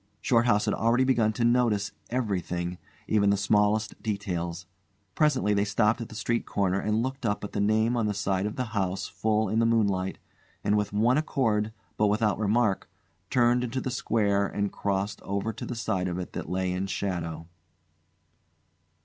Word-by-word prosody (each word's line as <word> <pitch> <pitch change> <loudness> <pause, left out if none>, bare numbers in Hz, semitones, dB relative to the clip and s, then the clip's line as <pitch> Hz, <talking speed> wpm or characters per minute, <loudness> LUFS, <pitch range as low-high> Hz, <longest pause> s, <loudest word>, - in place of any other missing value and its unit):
Shorthouse 115 -3 +3
had 105 - +1
already 115 +3 +2
begun 120 -5 +3
to 115 +1 0
notice 115 -5 +2 0.2
everything, 90 -7 -2 0.3
even 100 -2 +3
the 100 - +3
smallest 105 +2 +1
details. 90 -5 -3 0.5
Presently 135 -8 +2
they 100 0 +2
stopped 105 +3 +1
at 115 - -6
the - - -10
street 115 +2 -1
corner 95 -1 +1
and 110 +2 0
looked 130 +1 -4
up 105 -2 -1
at 105 - -5
the - - -3
name 110 +3 +2
on 115 -3 +1
the 105 - -1
side 100 -1 0
of 105 - -5
the 130 - -1
house 95 -2 -1
full 110 0 0
in 110 +4 +1
the 115 - +3
moonlight, 100 -5 +1 0.5
and 105 0 +2
with 105 -1 0
one 115 +7 +3
accord, 110 -8 0 0.3
but 105 - +3
without 105 -1 +1
remark, 110 -1 +1 0.4
turned 120 0 +3
into 125 +2 -2
the 130 - -3
square 100 -5 +1
and 100 0 -2
crossed 100 0 -2
over 100 +3 -2
to 110 - -7
the 125 - -4
side 95 -5 -1
of 90 -1 -3
it 90 -2 -6
that - - -5
lay 95 0 -1
in 95 +2 -2
shadow. 85 -5 -3
105 Hz, 180 wpm, -27 LUFS, 100-115 Hz, 0.5 s, Shorthouse